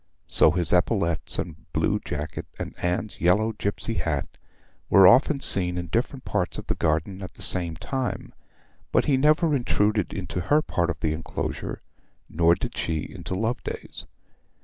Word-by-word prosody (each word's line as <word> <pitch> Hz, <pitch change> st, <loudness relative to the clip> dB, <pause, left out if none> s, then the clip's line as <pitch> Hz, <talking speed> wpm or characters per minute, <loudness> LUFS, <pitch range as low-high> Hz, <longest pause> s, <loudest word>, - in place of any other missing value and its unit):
So -, -, +5 dB
his 90 Hz, 0 st, +1 dB
epaulettes 90 Hz, -2 st, +1 dB
and -, -, -6 dB
blue -, -, +1 dB
jacket, 75 Hz, +1 st, -5 dB
and -, -, -5 dB
Anne's 90 Hz, +4 st, -2 dB
yellow 105 Hz, +6 st, +3 dB
gipsy 105 Hz, +2 st, -2 dB
hat, 75 Hz, -4 st, -3 dB, 0.5 s
were 95 Hz, -1 st, +7 dB
often 135 Hz, +7 st, +5 dB
seen 90 Hz, -2 st, +3 dB
in 85 Hz, -1 st, -4 dB
different 125 Hz, -, -2 dB
parts 95 Hz, -4 st, -1 dB
of -, -, -6 dB
the -, -, -1 dB
garden 80 Hz, +5 st, -1 dB
at 95 Hz, -, -8 dB
the -, -, -6 dB
same 85 Hz, -3 st, +1 dB
time; 130 Hz, -, -4 dB, 0.6 s
but -, -, +3 dB
he 140 Hz, -, +3 dB
never 150 Hz, +3 st, +3 dB
intruded 105 Hz, -5 st, +1 dB
into 90 Hz, -1 st, -4 dB
her 150 Hz, -, +2 dB
part 85 Hz, -1 st, -1 dB
of 90 Hz, -, -4 dB
the 80 Hz, -1 st, +1 dB
enclosure, 80 Hz, +1 st, -5 dB, 0.4 s
nor 85 Hz, +1 st, +3 dB
did -, -, -5 dB
she 80 Hz, -2 st, -1 dB
into 95 Hz, -, -5 dB
Loveday's. 110 Hz, +5 st, -4 dB
95 Hz, 160 wpm, -25 LUFS, 85-115 Hz, 0.6 s, were